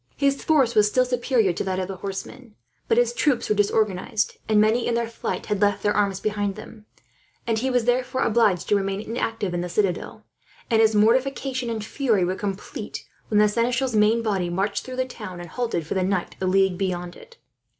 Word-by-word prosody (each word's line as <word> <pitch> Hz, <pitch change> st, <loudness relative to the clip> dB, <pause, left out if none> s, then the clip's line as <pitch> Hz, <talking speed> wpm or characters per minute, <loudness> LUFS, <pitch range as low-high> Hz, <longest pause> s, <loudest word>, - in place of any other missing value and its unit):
His 275 Hz, -1 st, +1 dB
force 275 Hz, -7 st, +3 dB
was 210 Hz, -2 st, +5 dB
still 255 Hz, +4 st, +2 dB
superior 245 Hz, -5 st, +1 dB
to 170 Hz, -, -3 dB
that 190 Hz, -1 st, -2 dB
of 185 Hz, -1 st, -2 dB
the 190 Hz, -1 st, -6 dB
horsemen, 205 Hz, +5 st, -7 dB, 0.3 s
but 455 Hz, -, +2 dB
his 485 Hz, 0 st, +3 dB
troops 290 Hz, -, +1 dB
were 210 Hz, -, +1 dB
disorganized; 205 Hz, 0 st, 0 dB
and 215 Hz, -1 st, +4 dB
many, 220 Hz, +3 st, +3 dB
in 235 Hz, -, +1 dB
their 235 Hz, -1 st, 0 dB
flight, 230 Hz, -, -4 dB
had 210 Hz, -2 st, -2 dB
left 205 Hz, -1 st, +2 dB
their 205 Hz, -, +2 dB
arms 200 Hz, -2 st, +1 dB
behind 205 Hz, -2 st, -1 dB
them, 215 Hz, -1 st, -12 dB, 0.6 s
and 225 Hz, -2 st, 0 dB
he 260 Hz, +3 st, -1 dB
was 245 Hz, -3 st, +1 dB
therefore 255 Hz, +1 st, +1 dB
obliged 210 Hz, -6 st, +2 dB
to 205 Hz, -, +4 dB
remain 195 Hz, 0 st, -1 dB
inactive 225 Hz, -3 st, -3 dB
in 175 Hz, -, -1 dB
the 180 Hz, -, -4 dB
citadel; 185 Hz, 0 st, -2 dB, 0.5 s
and 225 Hz, -1 st, +4 dB
his 220 Hz, -1 st, +4 dB
mortification 255 Hz, +3 st, +1 dB
and 220 Hz, -2 st, -3 dB
fury 220 Hz, -7 st, +1 dB
were 180 Hz, -, -1 dB
complete, 195 Hz, 0 st, -6 dB, 0.2 s
when 210 Hz, -, +1 dB
the 210 Hz, 0 st, +6 dB
seneschal's 240 Hz, +3 st, 0 dB
main 215 Hz, +2 st, +3 dB
body 195 Hz, -5 st, 0 dB
marched 195 Hz, +4 st, -1 dB
through 255 Hz, -, -7 dB
the 255 Hz, 0 st, 0 dB
town 210 Hz, -8 st, -8 dB
and 175 Hz, -1 st, -8 dB
halted, 235 Hz, -10 st, -2 dB
for -, -, -3 dB
the 190 Hz, -, 0 dB
night, 185 Hz, -1 st, -1 dB
a 185 Hz, -, 0 dB
league 190 Hz, -1 st, +2 dB
beyond 180 Hz, -2 st, -3 dB
it. 475 Hz, 0 st, -16 dB
215 Hz, 210 wpm, -24 LUFS, 195-245 Hz, 0.6 s, the